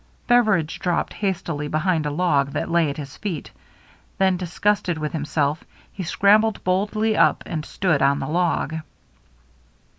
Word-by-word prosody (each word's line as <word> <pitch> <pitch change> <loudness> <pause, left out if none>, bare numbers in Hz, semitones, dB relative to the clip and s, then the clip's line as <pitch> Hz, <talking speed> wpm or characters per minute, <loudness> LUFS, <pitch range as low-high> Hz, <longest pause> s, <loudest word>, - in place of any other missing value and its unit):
Beveridge 215 -10 +2
dropped 175 -2 -1
hastily 170 -7 -2
behind 155 0 0
a - - 0
log 145 -3 +1
that - - -3
lay 170 -3 +3
at 140 - -5
his 140 -3 -8
feet. 185 -8 -5 0.7
Then, 190 -1 +3
disgusted 180 0 0
with 155 -1 -3
himself, 150 -1 -1 0.3
he 195 - -6
scrambled 205 +5 +3
boldly 210 +4 +1
up - - +3
and 155 -3 -4
stood 160 -3 0
on 140 +1 +3
the - - -4
log. 165 -1 0
170 Hz, 145 wpm, -22 LUFS, 150-195 Hz, 0.7 s, lay